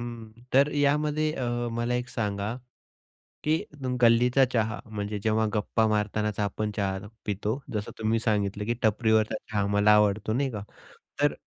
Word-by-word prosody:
हं. 115 -2 -7 0.2
तर 140 +3 +5
यामध्ये 150 +2 +2
अ, 120 -3 -2
मला 120 +1 -1
एक 125 0 -2
सांगा 105 -2 -2 0.9
की 155 +1 +2 0.3
तुम 125 -1 -1
गल्लीचा 120 +3 +5
चहा 110 -1 0
म्हणजे 105 -1 -4
जेव्हा 110 0 +2
गप्पा 110 +1 +1
मारतानाचा 105 0 0
आपण 105 +1 -2
चहा 95 -1 -2 0.2
पितो. 105 +4 -2
जसं 105 -1 -3
तुम्ही 110 +1 +1
सांगितलं 105 -2 0
की 120 - 0
"टपरीवरचा 110 0 +2 0.2
चहा 105 -2 +1
मला 105 +1 +5
आवडतो," 105 0 +3
नाही 135 +2 0
का? 105 -2 -5 0.6
तर 145 0 +3
110 Hz, 150 wpm, -27 LUFS, 105-120 Hz, 0.9 s, तर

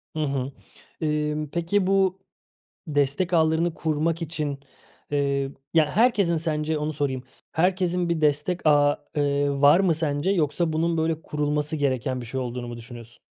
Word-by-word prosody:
Hı - - -3
hı. 135 -1 -2 0.5
Imm, 150 0 -1
peki 180 +4 0
bu 190 -1 +2 0.7
destek 145 +4 0
ağlarını 160 +1 +2
kurmak 160 +1 -1
için, 150 -3 -3 0.5
eee 140 -1 0 0.2
ya 155 -2 +4
herkesin 205 -6 +3
sence 155 -1 -1
onu 150 +1 -2
sorayım, 135 -3 -2 0.3
herkesin 180 +1 +1
bir 170 -2 0
destek 150 +4 0
ağı, 145 -1 +3
eee, 145 0 +1
var 145 +6 +7
mı 180 -4 +3
sence 150 +2 0
yoksa 165 -2 +1
bunun 165 +1 +1
böyle 160 0 0
kurulması 150 +1 -1
gereken 130 -2 -1
bir 120 - -7
şey 130 +2 -3
olduğunu 120 -1 -4
mu 120 - -6
düşünüyorsun? 120 0 -11
150 Hz, 150 wpm, -25 LUFS, 145-170 Hz, 0.7 s, var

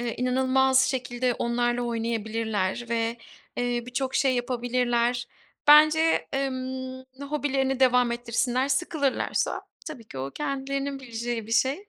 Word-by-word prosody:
eee 240 -1 -3
inanılmaz 260 +1 +3
şekilde 245 -1 -1
onlarla 240 0 0
oynayabilirler 225 -2 -2
ve, 230 0 -1 0.4
eee, 245 -1 -1
birçok 260 +2 -3
şey 265 -2 +3
yapabilirler. 245 0 0 0.4
Bence, 310 +2 +6
emm, 260 -1 -3 0.2
hobilerini 275 -2 -1
devam 250 -2 +4
ettirsinler. 245 +2 0
Sıkılırlarsa 285 -1 0 0.2
tabii 275 -8 -8
ki 135 - -8
o 135 +1 -4
kendilerinin 275 - -3
bileceği 235 -2 -4
bir 225 - -5
şey. 275 - +1
250 Hz, 115 wpm, -26 LUFS, 240-270 Hz, 0.4 s, Bence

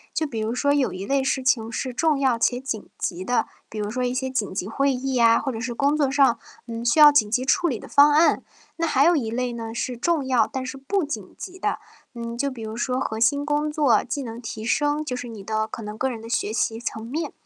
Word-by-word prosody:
就 315 - +1
比 235 -7 -4
如 220 +2 -2
说 285 +3 +2
有 285 -3 +1
一 185 +1 -6
类 275 +3 +1
事 265 0 0
情 230 -3 +1
是 255 +2 -3
重 310 +3 +2
要 260 -4 +1
且 245 +2 +2
紧 250 -5 -5
急 180 0 -3
的， 245 +5 +1 0.2
比 220 - -8
如 210 0 -2
说 250 +2 -2
一 245 0 -1
些 260 0 -2
紧 255 -6 -1
急 185 0 -3
会 275 +5 +1
议 265 +1 -2
呀， 230 -2 +5
或 270 - -2
者 225 - -5
是 245 -1 -3
工 280 +4 +2
作 290 -3 +2
上， 270 -3 +3 0.3
嗯， 230 -1 -6
需 240 +6 +2
要 300 -1 +10
紧 225 -8 +3
急 245 +4 0
处 350 +6 +2
理 255 -8 -1
的 - - -11
方 290 +1 +6
案。 315 +3 +4 0.4
那 335 0 0
还 275 -3 +3
有 345 - +5
一 245 -8 -1
类 245 +1 -2
呢， 225 -1 -6
是 250 +1 -2
重 310 +3 0
要 255 -2 +3
但 265 -2 -3
是 260 - -5
不 310 +8 -1
紧 220 -10 -6
急 370 0 -9
的， - - -1 0.4
嗯， 235 0 -5
就 280 +4 -1
比 250 -4 -8
如 220 0 -5
说 250 +2 -1
核 220 -4 -3
心 285 +5 +2
工 300 +1 0
作、 285 -8 +3
技 270 +3 -4
能 230 -1 -7
提 220 -2 -6
升， 290 +5 +1
就 255 - -3
是 250 0 -6
你 220 -4 -9
的 220 +1 -1
可 225 - -7
能 210 0 -6
个 260 +4 -1
人 235 -3 -5
的 225 - -10
学 230 -2 -1
习 225 0 -1
层 225 -2 -5
面。 300 +5 -3
250 Hz, 285 characters per minute, -24 LUFS, 225-285 Hz, 0.4 s, 要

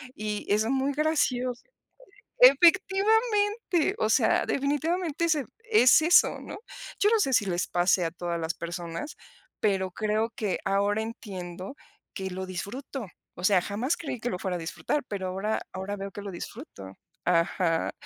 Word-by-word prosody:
y 210 -1 -4
es 210 +2 +2
muy 270 +3 0
gracioso. 255 -5 0 0.8
Efectivamente, 410 -1 +4
o - - +1
sea, - - +3
definitivamente 315 +4 -1
es 325 -2 +2 0.3
es 285 - +6
eso, 335 +3 +5
¿no? - - -8 0.4
Yo 415 - +5
no 455 - +4
sé 315 -10 +1
si 215 - +3
les 180 -2 -1
pase 175 +1 +2
a 165 - -2
todas 170 0 -4
las 165 0 -2
personas, 170 - -6 0.5
pero 190 -3 +1
creo 215 +3 -1
que 205 -5 -2
ahora 200 +2 +1
entiendo 190 -2 -7 0.4
que 190 0 -4
lo 190 +1 -4
disfruto, 215 +6 -6 0.3
o 175 - -9
sea, 190 -2 +4
jamás 220 - -1
creí 280 -6 -5
que 240 - -2
lo 180 - -4
fuera 185 -1 -2
a - - -7
disfrutar, 165 - -2
pero 195 -2 -4
ahora 195 +4 -2
ahora 190 +2 -4
veo 195 0 -6
que 205 - -8
lo 200 -1 -6
disfruto. 170 - -9 0.3
Ajá. 170 -1 +1
215 Hz, 155 wpm, -27 LUFS, 185-295 Hz, 0.8 s, es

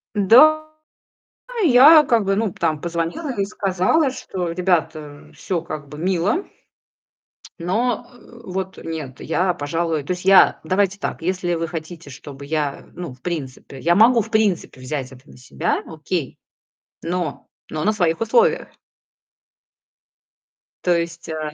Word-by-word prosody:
Да, 305 +10 +5 1.0
я 300 +3 +8
как 235 -5 +2
бы, 195 0 +1
ну, 210 -3 -1
там 160 -3 -1
позвонила 170 - -3
и 200 -4 -1
сказала, 195 - +1
что 185 -9 -5
ребята, 160 -5 -2
всё 180 -3 -3
как 150 -3 -7
бы 150 - -10
мило, 190 - 0 1.1
но 220 +7 -1 0.4
вот 190 0 -5
нет, 150 -6 -6
я, 180 +3 0
пожалуй 165 0 -2
то 140 - -5
есть 180 - -8
я 195 0 +6
давайте 195 +1 0
так, 200 - -5
если 180 0 -1
вы 165 0 -2
хотите, 160 -1 -8
чтобы 140 0 -10
я, 150 -2 -3
ну, 175 -7 -7
в 125 - -21
принципе, 140 -5 -6
я 170 +5 +2
могу 230 +3 +6
в 220 +2 -9
принципе 210 - 0
взять 130 0 -5
это 130 +2 -16
на - - -15
себя, 125 +7 -2
окей, 160 -2 -4 0.7
но 170 -3 -3 0.3
но 155 0 -3
на 215 - +3
своих 175 -6 0
условиях. 470 - +2 2.2
То 175 -1 +3
есть, 170 0 -6
а 155 -1 -4
175 Hz, 140 wpm, -21 LUFS, 155-200 Hz, 2.2 s, я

